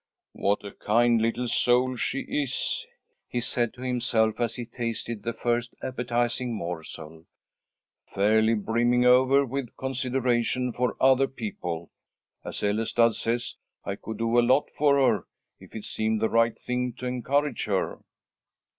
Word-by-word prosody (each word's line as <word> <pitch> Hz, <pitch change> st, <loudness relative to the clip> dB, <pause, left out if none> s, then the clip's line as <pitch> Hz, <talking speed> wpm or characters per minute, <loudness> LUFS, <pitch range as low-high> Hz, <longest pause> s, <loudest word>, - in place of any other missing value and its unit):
"What 100 Hz, +1 st, 0 dB
a 100 Hz, -, -6 dB
kind 115 Hz, +1 st, +2 dB
little 115 Hz, +2 st, 0 dB
soul 125 Hz, +2 st, +2 dB
she 135 Hz, +2 st, 0 dB
is," 140 Hz, -3 st, -1 dB, 0.4 s
he 120 Hz, -, -1 dB
said 120 Hz, -1 st, 0 dB
to 125 Hz, -, -12 dB
himself, 115 Hz, -3 st, +1 dB
as 115 Hz, -1 st, 0 dB
he 120 Hz, -, -5 dB
tasted 115 Hz, -2 st, -4 dB
the 115 Hz, -, -2 dB
first 120 Hz, +1 st, -1 dB
appetizing 120 Hz, -1 st, -1 dB
morsel, 80 Hz, -3 st, -7 dB, 0.9 s
"fairly 110 Hz, +3 st, +3 dB
brimming 120 Hz, +3 st, +2 dB
over 130 Hz, +3 st, +5 dB
with 130 Hz, -1 st, -5 dB
consideration 125 Hz, -2 st, 0 dB
for 125 Hz, 0 st, -1 dB
other 135 Hz, +1 st, +5 dB
people. 135 Hz, -, -5 dB, 0.5 s
As -, -, -4 dB
Ellestad 115 Hz, +2 st, +2 dB
says, 120 Hz, +2 st, -1 dB, 0.3 s
I 100 Hz, -, -2 dB
could 110 Hz, +1 st, -7 dB
do 115 Hz, +2 st, +2 dB
a -, -, +6 dB
lot 130 Hz, +4 st, +2 dB
for 145 Hz, -1 st, +3 dB
her, 135 Hz, -2 st, +2 dB, 0.3 s
if -, -, -15 dB
it 110 Hz, -, -6 dB
seemed 110 Hz, 0 st, 0 dB
the 110 Hz, -, +1 dB
right 115 Hz, 0 st, +2 dB
thing 125 Hz, 0 st, -2 dB
to 125 Hz, -, -8 dB
encourage 135 Hz, +4 st, 0 dB
her." 100 Hz, -3 st, -1 dB
120 Hz, 145 wpm, -26 LUFS, 110-125 Hz, 0.9 s, a